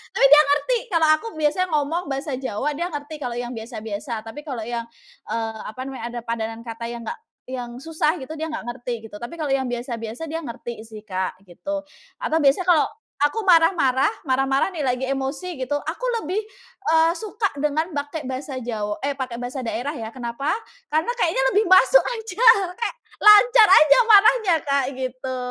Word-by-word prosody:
Tapi - - +5
dia 300 - +10
ngerti 295 - +2
kalau 330 -5 +2
aku 455 - -8
biasa 305 +3 0
ngomong 315 +2 0
bahasa 275 +1 -3
Jawa, 265 +3 -2
dia 340 +4 -3
ngerti 295 -1 -6
kalau 245 -4 -4
yang 245 0 -4
biasa-biasa. 225 0 -6
Tapi 225 +6 -9
kalau 250 -6 -4
yang, 235 0 -4 0.4
eee, 225 -1 -3
apa 220 +4 -9
namanya 265 -3 -7
ada 240 0 -5
padanan 225 -1 -4
kata 230 0 -6
yang 235 0 -6
nggak - - -6 0.2
yang 245 -2 -6
susah 310 +3 -1
gitu, 285 - -9
dia 320 - -2
nggak 315 -1 -5
ngerti 245 0 -5 0.2
gitu. 205 - -9
Tapi 240 +8 -7
kalau 300 -4 -3
yang 265 -1 +1
biasa-biasa 240 +2 -5
dia 325 - -2
ngerti 240 -5 -7
sih 215 -1 -11
Kak 185 -3 -3
gitu. 295 - -5 0.4
Atau 320 -8 +1
biasa 285 +4 +3
kalau 350 -4 +4 0.4
aku 350 +10 +1
marah-marah 325 -5 +4 0.2
marah-marah 270 +3 +2
nih 305 - -2
lagi 255 0 0
emosi 275 +6 -3
gitu, 260 +3 -2
aku 325 +12 -5 0.2
lebih, 365 +7 -1 0.5
eee, 320 +1 +4
suka 425 -1 -2
dengan 305 +4 0
pakai 290 +1 -4
bahasa 260 +1 -5
Jaw 210 -3 -3
eh 285 - +1
pakai 250 -2 -3
bahasa 250 +2 -5
daerah 250 +3 -3
ya. 225 -7 -6
Kenapa? 255 +6 -2 0.3
Karena 315 +9 0
kayaknya 325 -8 +2
lebih 420 +2 +3
masuk 380 +7 +6
aja. 450 -1 -1 0.3
Kek 470 +1 -2 0.2
lancar 425 +2 +8
aja 305 - +7
marahnya 420 -3 +6
Kak 280 -2 +1
gitu. 260 0 -4
275 Hz, 180 wpm, -23 LUFS, 240-325 Hz, 0.5 s, dia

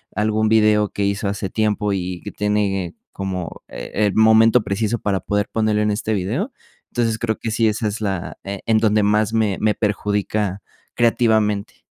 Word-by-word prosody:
algún 110 +1 +1
video 105 -2 +4
que 100 - -2
hizo 100 +1 -1
hace 100 -1 -3
tiempo 105 -1 0
y 90 -2 -3
que - - -7
tiene 100 -4 -1 0.2
como, 95 -3 -5
eh, - - -8
el 100 - +1
momento 110 +2 +6
preciso 105 +3 -1
para 100 -2 -1
poder 105 0 -1
ponerlo 110 -1 +1
en 105 0 +1
este 110 +1 -1
video, 110 - -2 0.4
entonces 115 -2 0
creo 110 -1 -1
que 115 - -3
sí, 115 0 +2
esa 110 0 0
es 105 +2 -3
la, 95 -4 -3
eh, 100 0 -5
en 110 - +4
donde 110 -1 +3
más 105 +1 +2
me 110 -4 +1
me 105 -1 +2
perjudica 105 -1 -1 0.3
creativamente. 110 -3 +1
105 Hz, 175 wpm, -21 LUFS, 100-110 Hz, 0.4 s, momento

